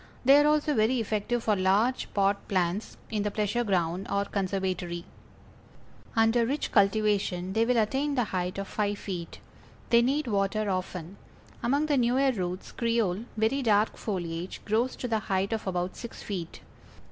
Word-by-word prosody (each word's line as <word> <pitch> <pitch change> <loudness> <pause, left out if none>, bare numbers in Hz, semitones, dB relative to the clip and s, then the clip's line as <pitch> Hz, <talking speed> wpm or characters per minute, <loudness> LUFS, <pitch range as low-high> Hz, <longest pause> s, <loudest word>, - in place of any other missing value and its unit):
They 275 +3 +8
are 295 - +4
also 300 0 +2
very 235 +1 +2
effective 225 +2 -1
for 215 - +2
large 200 +7 +1
pot 200 0 +1
plants 185 +2 -1
in 215 -2 0
the 210 - 0
pleasure 210 +3 0
ground, 180 -3 0
or 200 0 +1
conservatory. 185 -3 -2 1.1
Under 225 +1 +4
rich 275 +6 -1
cultivation 195 -3 +2
they 225 +2 +3
will 245 0 +2
attain 270 +6 +1
the 245 - +2
height 185 -3 -3
of 195 0 -4
five 205 -1 -1
feet. 180 -5 -6 0.5
They 235 0 +7
need 275 +5 +1
water 205 -1 0
often. 185 0 -4 0.4
Among 280 +5 +1
the 295 -2 +1
newer 255 +2 +3
roots 185 -4 -4
Creole, 230 -4 0
very 225 +6 +1
dark 215 -3 +2
foliage, 175 -3 -4
grows 230 +5 +1
to 250 - -4
the 225 -2 +1
height 195 +1 -1
of 220 -2 -3
about 180 0 -2
six 235 - -8
feet. 180 -5 -5
210 Hz, 160 wpm, -28 LUFS, 190-235 Hz, 1.1 s, They